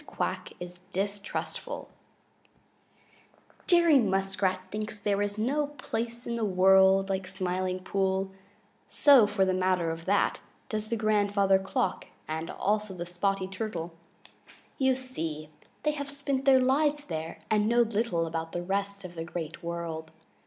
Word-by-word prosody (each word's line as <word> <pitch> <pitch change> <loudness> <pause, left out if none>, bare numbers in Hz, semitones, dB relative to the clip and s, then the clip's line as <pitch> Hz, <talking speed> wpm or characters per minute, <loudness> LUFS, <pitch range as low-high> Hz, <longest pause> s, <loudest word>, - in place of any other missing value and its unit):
QUACK - - -3
IS 180 0 -8
DISTRUSTFUL 200 - -4 1.8
Jerry 340 -5 +6
Muskrat 195 -3 +1
thinks 215 0 -4
there 205 -1 0
is 205 0 -1
no 280 +7 +1
place 235 0 -3
in 235 0 -2
the 230 - -1
world 190 0 +5
like 190 -1 -2
the - - -10
Smiling 185 -1 -2
Pool. 190 0 0 0.6
So, 270 -7 +6
for 205 -2 +2
the 185 - +1
matter 185 -2 +1
of 165 0 -7
that, 200 +1 +2 0.3
does 215 0 -3
Grandfather 205 -3 +3
Frog 235 +6 -1 0.2
and 160 +1 -3
also 210 -2 -1
Spotty 190 +2 -1
the 190 - -10
Turtle. 185 -4 -4 0.9
You 265 -1 +3
see, 160 -12 -5 0.3
they 300 - +3
have 285 -1 -5
spent 280 -1 -2
their 270 -1 +7
lives 290 +3 +2
there 160 -1 -5
and 210 0 +3
know 240 +1 +4
little 220 -6 0
about 165 0 -4
the 175 - -2
rest 200 +1 -2
of 175 - -8
the 165 -1 -5
Great 165 -1 -6
World. 170 -2 -4
195 Hz, 145 wpm, -29 LUFS, 180-230 Hz, 1.8 s, their